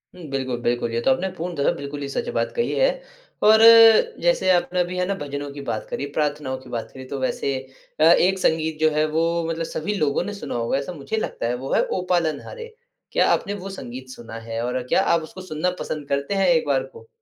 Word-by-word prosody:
हुँ, 180 - -12
बिल्कुल, 130 -2 -2
बिल्कुल। 120 -1 0
ये 115 - -1
तो 135 - +5
आपने 190 +7 -2
पूर्णतः 170 -5 -1
बिल्कुल 140 +1 -6
ही 140 - -3
सच 235 - -3
बात - - 0
कही 470 - 0
है - - +4 0.6
और 220 +1 +7 0.6
जैसे - - +2
आपने 180 0 +1
अभी 180 +1 -1
है 180 - +1
ना, 200 - 0
भजनों 145 -2 -5
की 140 - -7
बात 110 - -2
करी, 140 - -3
प्रार्थनाओं 145 -3 -1
की 130 - -15
बात 115 -2 -4
करी 130 -1 -9
तो 140 0 -5
वैसे 135 +1 -1 0.5
अ, - - +4
एक 180 +3 +5
संगीत 160 -2 0
जो 155 0 +4
है 155 0 +3
वो 160 +1 +1 0.3
मतलब 165 0 -2
सभी 185 +7 -3
लोगों 150 0 +1
ने 205 +2 -5
सुना 200 - -6
होगा 115 +3 0
ऐसा 140 +6 -4
मुझे 165 +9 -4
लगता 165 - -3
है, 120 - 0
वो 135 +2 -4
है - - +4
ओ 185 - -2
पालन 160 -5 +1
हारे। 470 -2 -9 0.4
क्या - - +3
आपने 200 - 0
वो 195 -1 -6
संगीत 130 -8 -8
सुना 115 -3 -10
है? 115 0 -5
और 125 +1 -2
क्या 190 - +3
आप 170 - +2
उसको 185 +4 -10
सुनना 180 0 -2
पसंद 150 -2 -5
करते 140 +6 -1
हैं 195 -1 +2
एक 160 -3 +3
बार 135 -2 +2
को? 115 -4 -14
155 Hz, 235 wpm, -23 LUFS, 135-180 Hz, 0.6 s, और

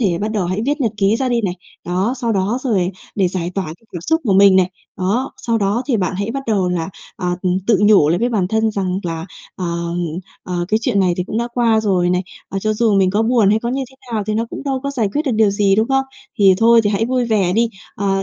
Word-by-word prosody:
thể 185 -7 +1
bắt 210 +2 -2
đầu 205 -5 -1
hãy 185 +4 -2
viết 290 +1 0
nhật 225 -4 +1
ký 200 +2 +2
ra 260 0 -1
đi 240 -1 +1
này. 180 -2 -1 0.3
Đó, 185 +7 0
sau 235 -2 -1
đó 200 +4 0
rồi 195 -8 +1 0.2
để 190 -3 +2
giải 175 -1 -3
tỏa 195 - -1
cái 165 +7 -10
cảm 175 - -5
xúc 320 - +1
của 205 - +2
mình 195 0 +6
này. 185 -1 +3 0.3
Đó, 215 +9 -1
sau 230 -1 -1
đó 205 +4 0
thì 255 - +1
bạn 185 -2 -1
hãy 200 +3 -2
bắt 275 +2 -4
đầu 195 -5 +1
là, 170 -2 -2 0.3
ờ, 180 - -3
ừm, 185 0 +1
tự 225 -4 +4
nhủ 205 -8 +5
lại 170 +3 +2
với 240 +2 +1
bản 200 -6 0
thân 220 +1 +1
rằng 190 -3 -2
là, 165 0 -4 0.3
ờ, 185 - -4 0.8
ờ, 175 -1 -3
cái 215 - +2
chuyện 200 -2 +1
này 180 -2 +2
thì 180 - -2
cũng 215 +4 -3
đã 235 - -1
qua 230 -3 +3
rồi 185 -4 +1
này, 180 0 +1 0.3
ờ, 195 - -3
cho 215 +2 0
dù 215 -1 +2
mình 190 -1 +3
có 210 +3 +1
buồn 225 -3 +3
hay 215 - +3
có 235 +1 -4
như 270 +2 -1
thế 265 - -20 0.2
nào 215 -2 0
thì 215 - -1
nó 225 +2 -1
cũng - - -6
đâu 265 -2 -1
có 280 - -2
giải 235 -7 0
quyết 300 - +1
được 275 -5 -1
điều 215 -2 +3
gì, 200 -1 +2
đúng 220 +3 +2
không? 270 0 +2 0.3
Thì 195 -2 +6
thôi 230 +1 +6
thì 205 - +2
hãy 215 +2 +1
vui 250 0 0
vẻ 205 -6 +1
đi. 230 +2 +2 0.3
Ờ, 195 -1 0
205 Hz, 275 wpm, -18 LUFS, 185-230 Hz, 0.8 s, mình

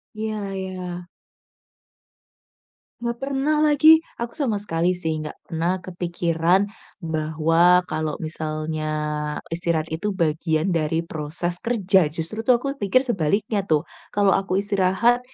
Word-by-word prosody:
Iya 215 0 -3 0.2
iya. 180 -2 -5 1.9
Nggak 235 0 -2
pernah 275 +3 0
lagi. 310 +2 +6 0.2
Aku 235 +4 -4
sama 230 -9 0
sekali 175 -2 0
sih 160 -3 -2
nggak 150 - -7
pernah 170 +3 -1
kepikiran 175 +1 0 0.3
bahwa, 165 +2 +3
kalau 155 0 -2
misalnya 155 -1 -3 0.6
istirahat 165 -1 -1
itu 180 +6 -2
bagian 160 +1 0
dari 165 -1 +1
proses 165 +2 -4
kerja. 195 -7 +2
Justru 165 +9 -4
tuh 250 - +6
aku 275 +1 -3
pikir 205 +5 +3
sebaliknya 205 - 0
tuh, 155 -1 +2 0.3
kalau 200 -1 +3
aku 190 -1 +1
istirahat 200 +4 +2
180 Hz, 115 wpm, -23 LUFS, 160-210 Hz, 1.9 s, lagi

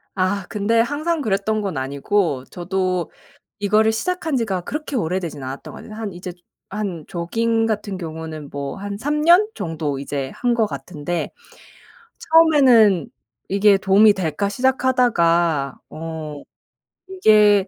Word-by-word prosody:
아 190 0 0
근데 215 +2 +1
항상 300 +6 0
그랬던 215 -1 0
건 195 -5 -3
아니고 140 +2 -1
저도 185 -1 -2 0.5
이거를 215 +2 +3
시작한 320 +5 -2
지가 195 -6 -1
그렇게 300 - -5
오래되지는 170 - -2
않았던 130 +1 -7
것 - - -10
같아요. 215 - -10
한 210 -4 -4
이제 180 0 -7 0.4
한 195 -6 -4
조깅 225 +6 0
같은 210 -3 -2
경우는 160 -3 -7
뭐 140 -1 -5
한 200 0 -5
3 295 +4 -1
년 355 +6 +6
정도 155 -4 -3
이제 140 -1 -4
한 245 -1 +1
것 225 -2 +2
같은데 175 -1 -4 0.9
처음에는 260 - +5 0.4
'이게 200 +1 +4
도움이 195 +2 +5
될까?' 190 +2 -2
시작하다가 175 - +2
어 155 -2 -7 0.7
이게 210 - +4
200 Hz, 270 characters per minute, -21 LUFS, 165-225 Hz, 0.9 s, 년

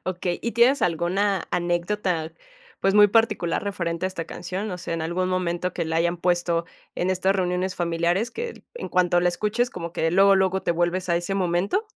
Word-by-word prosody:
Okey, 180 -1 -2
¿y 235 - -2
tienes 245 +4 +4
alguna 180 +3 0
anécdota, 175 -1 -1 0.5
pues, 195 0 +2
muy 210 0 +8
particular 210 -5 +1
referente 180 -3 -2
a - - -1
esta 180 -3 -5
canción? 185 +4 -5
O 180 - -5
sea, 170 - -4
¿en 165 - -3
algún 180 +3 -1
momento 180 -1 -1
que - - -2
la 160 0 -2
hayan 170 +1 +1
puesto 175 -1 0 0.3
en 180 - -1
estas 190 +1 +1
reuniones 180 0 -1
familiares 175 +6 0
que, 470 0 -6
en 485 - -6
cuanto 175 -1 +2
la 175 - +3
escuches, 210 +7 0
como 170 -1 -6
que 165 -1 0
luego, 195 +3 +5
luego 190 0 +1
te - - 0
vuelves 175 +2 -1
a 170 - +3
ese 175 +3 -2
momento? 190 - 0
180 Hz, 195 wpm, -24 LUFS, 170-195 Hz, 0.5 s, muy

